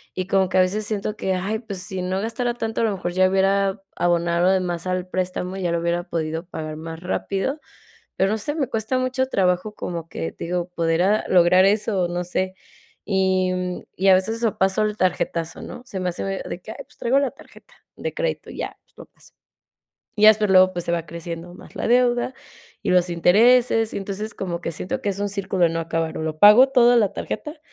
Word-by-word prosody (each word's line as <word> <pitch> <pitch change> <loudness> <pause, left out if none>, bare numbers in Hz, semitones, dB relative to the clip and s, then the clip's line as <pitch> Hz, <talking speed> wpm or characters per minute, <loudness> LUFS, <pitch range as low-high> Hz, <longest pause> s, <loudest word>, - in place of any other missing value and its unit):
y 185 -1 -3
como 190 -1 +2
que - - 0
a - - +7
veces 200 +4 0
siento 215 0 -3
que: 190 - -1
"¡Ay!, 200 +4 -2
pues, 205 -5 -7
si 185 +1 -4
no 185 +2 -2
gastara 240 +2 -2
tanto, 225 -1 -3
a - - +3
lo 215 - 0
mejor 175 -2 -4
ya 185 +1 +4
hubiera 195 +1 +1
abonado 175 +1 +2
de 190 - +3
más 175 -1 -4
al 185 0 -2
préstamo, 185 0 -3
ya 180 -3 -1
lo 170 0 0
hubiera 170 +1 0
podido 160 +1 -3
pagar 155 -3 -6
más 165 +1 -7
rápido", 195 - -2 0.6
pero, 195 +1 +2
no 220 - -1
sé, 290 +8 -3
me 275 - 0
cuesta 225 +3 -1
mucho 255 +1 0
trabajo, 185 0 0
como 170 -2 -5
que, 80 - -5
te - - -8
digo, 175 0 -2
poder, 165 -1 0
ah, 205 +3 +2
lograr 185 +1 +5
eso 205 -2 +1
o - - -1
no 175 +1 -3
sé, 185 +1 -2 0.5
y 190 -2 +1 0.4
y 195 +2 +1
a 190 - +8
veces 190 +5 +1
eso 230 -3 -1
pasó 190 +2 +2
el 215 0 -1
tarjetazo, 170 -3 -1
¿no?, 245 - -8
se 195 -6 -5
me 180 - -1
hace 175 - -5
de 195 -2 -4
que: 215 - -9
"Ay, - - -11
pues, - - -23
traigo 260 +4 +2
la 275 -3 0
tarjeta", 275 - -18 0.2
de - - -5
crédito - - -3
y - - -10
ya - - -5
pues, - - -37
lo - - -9
paso. - - -21 0.8
Ya, 215 +1 +8
pues, 210 -1 -1
luego, 185 0 +6
pues, 175 -2 -4
se 170 - 0
va 170 -1 -1
creciendo 170 +1 -7
más - - -15
la - - -2
deuda 245 +1 +2 0.5
y - - -1
los 180 -1 +3
intereses, 225 +6 +4
y - - -1
entonces, 200 +2 -5
como 175 -3 -4
que 170 - -3
siento 180 - -4
que - - -1
es 200 - -5
un 205 - 0
círculo 195 -2 0
de 165 - +3
no 165 0 -2
acabar, 165 0 -2
o - - -3
lo 155 -1 -4
pago 210 +8 +8
todo 245 -2 +5
en 235 - +5
la 205 -2 +1
tarjeta 300 +1 -5
190 Hz, 230 wpm, -22 LUFS, 175-215 Hz, 0.8 s, a